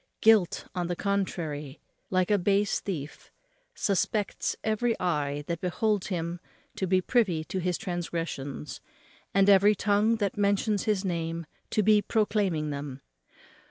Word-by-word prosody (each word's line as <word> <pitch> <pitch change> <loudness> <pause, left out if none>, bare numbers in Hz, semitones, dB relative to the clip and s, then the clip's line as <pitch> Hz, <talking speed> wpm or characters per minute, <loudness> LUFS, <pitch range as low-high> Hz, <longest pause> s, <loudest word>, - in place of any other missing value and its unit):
Guilt, 215 -5 +4
on 175 -1 -2
the 175 - -2
contrary, 165 -7 -2 0.3
like 185 +1 +1
a 205 - +4
base 200 +2 +2
thief, 155 -7 -6 0.5
suspects 205 - 0
every 220 +2 0
eye 145 -4 -1
that 170 0 -3
beholds 205 +2 0
him 170 -2 -3 0.4
to 190 - -2
be 185 +1 +3
privy 185 -9 +1
to 185 +4 -4
his 180 -1 0
transgressions, 165 - -4 0.5
and 195 0 +4
every 200 +1 +6
tongue 210 +3 +2
that 205 -4 -1
mentions 200 0 +1
his 210 -2 +1
name 165 -2 -2 0.2
to 215 - +1
be 210 +1 +5
proclaiming 200 -8 0
them. 140 -1 -6
185 Hz, 135 wpm, -28 LUFS, 165-205 Hz, 0.5 s, every